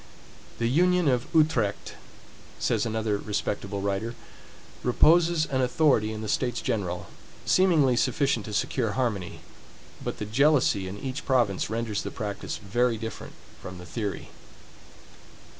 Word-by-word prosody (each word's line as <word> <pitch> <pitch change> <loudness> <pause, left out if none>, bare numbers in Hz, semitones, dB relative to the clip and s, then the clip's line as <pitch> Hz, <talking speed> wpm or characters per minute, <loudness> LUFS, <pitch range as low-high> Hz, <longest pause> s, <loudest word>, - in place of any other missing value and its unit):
The 115 - -1
union 180 +6 +3
of 125 -2 +1
Utrecht, 150 -11 +1 0.6
says - - 0
another 110 -2 -1
respectable 100 -1 -3
writer, 100 +4 -2 0.7
reposes 165 +5 +4
an 130 -3 -1
authority 125 -4 +2
in 110 0 -5
the - - -4
States 120 +3 0
General, 90 -5 -2 0.4
seemingly 160 -9 +4
sufficient 130 -2 +1
to 105 - -7
secure 115 +1 0
harmony, 105 -8 -2 0.6
but - - -4
the 105 - -4
jealousy 125 -4 +3
in 95 +2 -6
each 130 +5 -5
province 120 -10 +1
renders 110 -2 -2
the - - -4
practice 100 -2 -5
very 115 +3 0
different 110 -1 -7 0.3
from 90 0 -8
the 90 - -10
theory. 100 +4 -4
115 Hz, 130 wpm, -27 LUFS, 105-135 Hz, 0.7 s, reposes